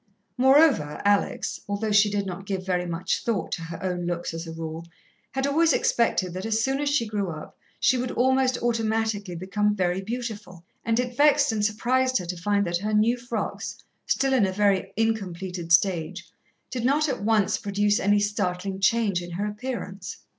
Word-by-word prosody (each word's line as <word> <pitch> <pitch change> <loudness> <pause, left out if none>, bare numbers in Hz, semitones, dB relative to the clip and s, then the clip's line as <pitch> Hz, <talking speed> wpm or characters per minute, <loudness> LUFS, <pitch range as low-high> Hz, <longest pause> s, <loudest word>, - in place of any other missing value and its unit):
Moreover, 265 - +4
Alex, 205 0 +1
although 205 +2 -1
she 205 0 +5
did 200 -1 -1
not 190 +1 -6
give 190 -2 -3
very 180 -1 -1
much 170 +1 -2
thought 225 -5 -1
to - - -3
her 165 +1 -8
own 180 -2 -2
looks 175 -1 -3
as 165 +1 -6
a - - -6
rule, 165 0 -6 0.5
had 265 0 0
always 320 +4 +3
expected 190 -6 +1
that 185 +1 -5
as 220 0 +1
soon 270 +2 0
as 290 - 0
she 285 -5 +1
grew 205 -3 -2
up 155 -2 -8 0.2
she 255 - +3
would 250 0 -2
almost 260 0 +2
automatically 220 -4 -1
become 210 +4 0
very 180 -1 0
beautiful, 210 -5 -6 0.2
and 230 +1 +1
it 250 -1 -2
vexed 290 0 +4
and 215 -2 -1
surprised 255 +5 +1
her 180 - -4
to 180 +1 -4
find 200 +3 0
that 170 0 -1
her 210 +2 -1
new 220 +3 +3
frocks, 240 -2 -4 0.3
still 270 -1 +1
in 230 -7 +4
a - - -2
very 200 -1 +1
incompleted 190 -6 -2
stage, 175 -1 +2 0.4
did 250 -3 -3
not 290 +5 +2
at 260 -6 -2
once 215 -2 +2
produce 205 +1 +1
any 205 +1 +3
startling 195 -2 -2
change 200 -2 +2
in 175 - -8
her 200 +4 -2
appearance. 210 -4 -5
205 Hz, 185 wpm, -25 LUFS, 185-235 Hz, 0.5 s, she